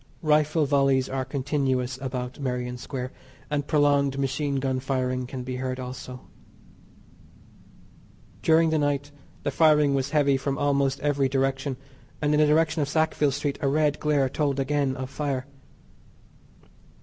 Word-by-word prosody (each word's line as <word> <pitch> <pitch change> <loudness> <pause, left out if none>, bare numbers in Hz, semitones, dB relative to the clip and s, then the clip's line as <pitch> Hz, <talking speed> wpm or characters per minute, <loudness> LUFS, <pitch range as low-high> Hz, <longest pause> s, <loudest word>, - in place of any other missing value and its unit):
Rifle 155 0 +3
volleys 135 -2 +2
are 135 0 -2
continuous 130 -2 -1
about 125 -1 -4
Merrion 125 -2 -3
Square, 130 0 -5 0.4
and 145 -1 -1
prolonged 145 -2 +2
machine 140 +1 -1
gun 130 -1 0
firing 130 -1 -1
can 130 0 -6
be 130 0 -4
heard 130 0 -3
also. 125 0 -7 2.2
During 160 +5 +4
the 160 - +2
night 145 0 -1 0.3
the 145 - -1
firing 150 -1 +4
was 135 0 0
heavy 145 -3 +3
from 135 +1 -2
almost 140 -1 +1
every 140 -2 +1
direction; 135 0 -1 0.4
and 150 0 +1
in 150 - +3
the 155 - +5
direction 160 +1 +2
of 145 - -1
Sackville 155 -1 +2
Street 145 +1 -2
a 140 - +1
red 150 +1 +1
glare 145 -3 +2
told 140 0 -1
again 140 -1 0
of 130 0 -6
fire. 140 -3 -2
140 Hz, 145 wpm, -26 LUFS, 130-145 Hz, 2.2 s, the